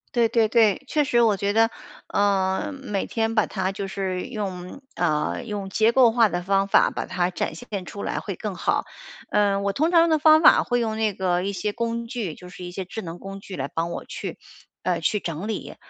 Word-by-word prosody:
对 235 Hz, -2 st, +3 dB
对 225 Hz, -1 st, +3 dB
对。 220 Hz, -1 st, +3 dB
确 300 Hz, -, +2 dB
实 240 Hz, -4 st, +2 dB
我 220 Hz, -3 st, +4 dB
觉 200 Hz, +1 st, -1 dB
得， 225 Hz, +2 st, +4 dB, 0.4 s
呃， 195 Hz, +4 st, +1 dB
每 270 Hz, -8 st, -3 dB
天 225 Hz, 0 st, -1 dB
把 215 Hz, -, +4 dB
它 190 Hz, -1 st, -2 dB
就 200 Hz, -1 st, -4 dB
是 190 Hz, -1 st, -3 dB
用， 195 Hz, -1 st, -6 dB
呃， 155 Hz, +4 st, 0 dB
用 205 Hz, -4 st, -5 dB
结 220 Hz, +3 st, +3 dB
构 245 Hz, -1 st, +6 dB
化 230 Hz, -2 st, +4 dB
的 175 Hz, -, -2 dB
方 195 Hz, +2 st, +1 dB
法 -, -, +5 dB
把 -, -, -4 dB
它 180 Hz, -1 st, 0 dB
展 175 Hz, -, -2 dB
现 185 Hz, +3 st, -6 dB
出 200 Hz, -, -8 dB
来 -, -, -2 dB
会 -, -, -4 dB
更 -, -, -4 dB
好。 -, -, 0 dB, 0.5 s
嗯， 200 Hz, -1 st, +2 dB
我 200 Hz, 0 st, 0 dB
通 320 Hz, +4 st, +1 dB
常 335 Hz, -1 st, +6 dB
的 315 Hz, -, +4 dB
方 310 Hz, +1 st, +6 dB
法 -, -, +7 dB
会 245 Hz, -1 st, 0 dB
用 220 Hz, -2 st, -1 dB
那 220 Hz, -2 st, +1 dB
个 180 Hz, -1 st, 0 dB
一 200 Hz, -, -1 dB
些 200 Hz, +2 st, -3 dB
工 235 Hz, 0 st, -3 dB
具， 225 Hz, -, -4 dB
就 180 Hz, -, -12 dB
是 180 Hz, 0 st, -10 dB
一 175 Hz, -, -6 dB
些 185 Hz, 0 st, -5 dB
智 220 Hz, +5 st, -6 dB
能 170 Hz, -1 st, -7 dB
工 195 Hz, 0 st, -8 dB
具 190 Hz, -3 st, -8 dB
来 135 Hz, -, -2 dB
帮 165 Hz, +3 st, -3 dB
我 -, -, -5 dB
去， -, -, -6 dB, 0.5 s
呃， 175 Hz, -2 st, 0 dB
去 210 Hz, +5 st, +1 dB
整 170 Hz, +5 st, -5 dB
理。 -, -, -5 dB
200 Hz, 240 characters per minute, -24 LUFS, 185-230 Hz, 0.5 s, 法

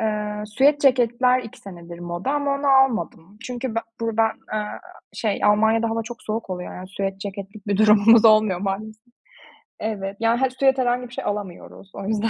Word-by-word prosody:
Eee, 210 Hz, -1 st, -2 dB
süet 275 Hz, +7 st, +2 dB
ceketler 250 Hz, -1 st, +3 dB
2 225 Hz, -, -11 dB
senedir 170 Hz, -3 st, -11 dB
moda 175 Hz, +7 st, -4 dB
ama 285 Hz, -1 st, 0 dB
onu 280 Hz, +1 st, -3 dB
almadım. 245 Hz, -9 st, +1 dB
Çünkü 250 Hz, -1 st, -5 dB
be -, -, +1 dB, 0.2 s
buradan, 225 Hz, -1 st, +1 dB, 0.2 s
eee, 215 Hz, -1 st, -1 dB, 0.5 s
şey 215 Hz, -3 st, -2 dB
Almanya'da 220 Hz, +2 st, +3 dB
hava 225 Hz, 0 st, -1 dB
çok 235 Hz, +1 st, -10 dB
soğuk 220 Hz, -1 st, -4 dB
oluyor, 180 Hz, -1 st, -5 dB
yani, 185 Hz, 0 st, -9 dB
süet 195 Hz, 0 st, -4 dB
ceketlik 200 Hz, +1 st, -8 dB
bir 200 Hz, -1 st, 0 dB
durumumuz 215 Hz, +2 st, +6 dB
olmuyor 215 Hz, -4 st, +5 dB
maalesef. 215 Hz, +4 st, -5 dB, 0.7 s
Evet, 200 Hz, -2 st, -4 dB
ya, 230 Hz, +2 st, +1 dB
hani, 265 Hz, -1 st, +2 dB
süet 270 Hz, -1 st, +4 dB
herhangi 250 Hz, -1 st, 0 dB
bir 240 Hz, -, -16 dB
şey -, -, -5 dB
alamıyoruz 200 Hz, -1 st, -6 dB
o 195 Hz, -, -7 dB
yüzden. 220 Hz, +1 st, 0 dB
220 Hz, 175 wpm, -22 LUFS, 200-240 Hz, 0.7 s, durumumuz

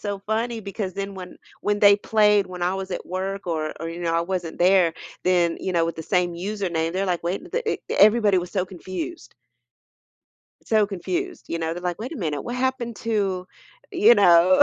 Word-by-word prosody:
so 205 Hz, -1 st, -3 dB
funny, 225 Hz, +3 st, -2 dB
because 200 Hz, -1 st, -5 dB
then 195 Hz, 0 st, -4 dB
when 180 Hz, -1 st, -9 dB, 0.2 s
when 205 Hz, 0 st, 0 dB
they 205 Hz, -1 st, +7 dB
played 210 Hz, -1 st, +3 dB
when 180 Hz, -1 st, -7 dB
I 180 Hz, +2 st, +1 dB
was 190 Hz, 0 st, -5 dB
at 180 Hz, -, -4 dB
work 190 Hz, +2 st, -4 dB
or 155 Hz, -2 st, -2 dB
or, 165 Hz, -, -4 dB
you 170 Hz, +1 st, -7 dB
know, 165 Hz, -1 st, 0 dB
I 165 Hz, -, +2 dB
wasn't 175 Hz, -2 st, -4 dB
there, 180 Hz, -2 st, +4 dB, 0.3 s
then, 175 Hz, -2 st, +2 dB
you 185 Hz, -, -2 dB
know, 170 Hz, -2 st, +2 dB
with 165 Hz, -, -3 dB
the 160 Hz, -, -5 dB
same 180 Hz, +1 st, +1 dB
username, 175 Hz, -3 st, -2 dB
they're 190 Hz, +2 st, 0 dB
like, 180 Hz, -2 st, -1 dB
"Wait, 175 Hz, +3 st, -3 dB
the 475 Hz, -2 st, -1 dB
eh -, -, +1 dB
the" -, -, -1 dB
everybody 210 Hz, -2 st, +5 dB
was 180 Hz, 0 st, -5 dB
so 185 Hz, -2 st, 0 dB
confused 180 Hz, -7 st, -7 dB, 1.3 s
so 215 Hz, -2 st, +3 dB
confused, 350 Hz, -, -4 dB
you 170 Hz, -, -2 dB
know, 165 Hz, 0 st, -2 dB
they're 175 Hz, -, -7 dB
like, 175 Hz, -1 st, -2 dB
"Wait 245 Hz, +7 st, -5 dB
a -, -, -6 dB
minute, 155 Hz, -, -2 dB
what 240 Hz, -, -5 dB
happened 250 Hz, -3 st, -1 dB
to" 200 Hz, -5 st, -1 dB, 0.5 s
you 415 Hz, +6 st, +6 dB
know? 175 Hz, -, +6 dB
190 Hz, 210 wpm, -24 LUFS, 175-210 Hz, 1.3 s, they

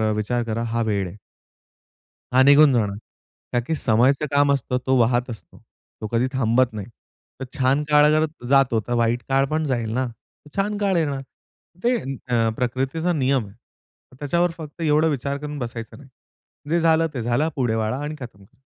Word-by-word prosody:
विचार 120 Hz, +3 st, -1 dB
करा 115 Hz, 0 st, -3 dB
हा 115 Hz, 0 st, -1 dB
वेळ 100 Hz, -4 st, -1 dB
आहे. 90 Hz, -, -11 dB, 1.2 s
हा 130 Hz, -, +6 dB
निघून 145 Hz, +1 st, +6 dB
जाणार 105 Hz, -5 st, 0 dB, 0.6 s
कारण 120 Hz, -1 st, +1 dB
की 160 Hz, -, 0 dB
समयच 125 Hz, +1 st, +3 dB
काम 145 Hz, 0 st, +3 dB
असतं. 125 Hz, -2 st, -1 dB
तो 130 Hz, -, +2 dB
वाहत 120 Hz, +2 st, +2 dB
असतो. 115 Hz, -, -10 dB, 0.4 s
तो 110 Hz, -, -3 dB
कधी 120 Hz, +2 st, +1 dB
थांबत 125 Hz, -1 st, +2 dB
नाही. 105 Hz, -2 st, -6 dB, 0.5 s
तर 135 Hz, -, -4 dB
छान 135 Hz, +3 st, +2 dB
काळ 150 Hz, 0 st, +6 dB
अगर 155 Hz, +1 st, +4 dB, 0.2 s
जातो, 135 Hz, -4 st, +4 dB
तर 120 Hz, -, -1 dB
वाईट 120 Hz, 0 st, +1 dB
काळ 135 Hz, 0 st, +3 dB
पण 155 Hz, +1 st, 0 dB
जाईल 120 Hz, -5 st, -1 dB
ना. 130 Hz, +2 st, 0 dB, 0.5 s
छान 205 Hz, +1 st, -1 dB
काळ 200 Hz, -2 st, +1 dB
येणार. 145 Hz, -5 st, -1 dB, 0.6 s
ते 245 Hz, +1 st, +3 dB, 0.3 s
अ, 115 Hz, -2 st, +2 dB
प्रकृतीचा 135 Hz, +8 st, -1 dB
नियम 135 Hz, -5 st, +1 dB
आहे. 100 Hz, -, -16 dB, 0.6 s
त्याच्यावर 170 Hz, +4 st, +1 dB
फक्त 160 Hz, 0 st, -9 dB
एवढा 155 Hz, 0 st, +3 dB
विचार 140 Hz, -1 st, -2 dB
करून 150 Hz, +1 st, -6 dB
बसायचं 115 Hz, -2 st, -6 dB
नाही. 135 Hz, -1 st, -16 dB, 0.6 s
जे 170 Hz, +2 st, +2 dB
झालं 165 Hz, 0 st, +3 dB
ते 125 Hz, -, -3 dB
झालं. 120 Hz, +7 st, 0 dB
पुढे 120 Hz, -5 st, 0 dB
वळा 110 Hz, +2 st, -1 dB
आणि 150 Hz, +1 st, -4 dB
खतम 115 Hz, -6 st, -10 dB
करा. 95 Hz, -, -24 dB
130 Hz, 175 wpm, -22 LUFS, 115-150 Hz, 1.2 s, हा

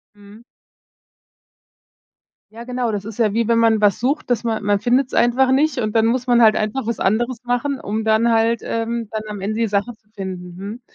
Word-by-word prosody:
Mhm. 205 Hz, +3 st, -16 dB, 2.1 s
Ja 230 Hz, +2 st, -10 dB
genau, 250 Hz, -1 st, -2 dB
das 205 Hz, -1 st, -4 dB
ist 220 Hz, 0 st, -8 dB
ja 215 Hz, -3 st, +1 dB
wie, 230 Hz, -1 st, 0 dB
wenn 230 Hz, -1 st, +3 dB
man 225 Hz, -2 st, +3 dB
was 205 Hz, +1 st, +3 dB
sucht, 270 Hz, +5 st, -1 dB
dass 240 Hz, -2 st, 0 dB
man 220 Hz, -2 st, -2 dB
man 205 Hz, 0 st, +1 dB
findet's 250 Hz, +3 st, +1 dB
einfach 255 Hz, +2 st, +3 dB
nicht 285 Hz, +1 st, +2 dB
und 215 Hz, -1 st, -2 dB
dann 225 Hz, 0 st, +4 dB
muss 250 Hz, +2 st, 0 dB
man 240 Hz, -1 st, +4 dB
halt 215 Hz, -1 st, +6 dB
einfach 215 Hz, +4 st, -2 dB
was 235 Hz, 0 st, -3 dB
anderes 235 Hz, +5 st, 0 dB
machen, 245 Hz, +3 st, -1 dB
um 215 Hz, +2 st, -3 dB
dann 220 Hz, +2 st, +2 dB
halt, 230 Hz, +1 st, +2 dB
ähm, 230 Hz, 0 st, -3 dB
dann 215 Hz, -1 st, -3 dB
am 205 Hz, -2 st, -7 dB
Ende 215 Hz, +3 st, -3 dB
die 230 Hz, -, +2 dB
Sache 205 Hz, +4 st, -1 dB
zu 215 Hz, -, -41 dB
finden, 180 Hz, -2 st, -7 dB
mhm. 205 Hz, +6 st, -8 dB
225 Hz, 210 wpm, -20 LUFS, 210-240 Hz, 2.1 s, halt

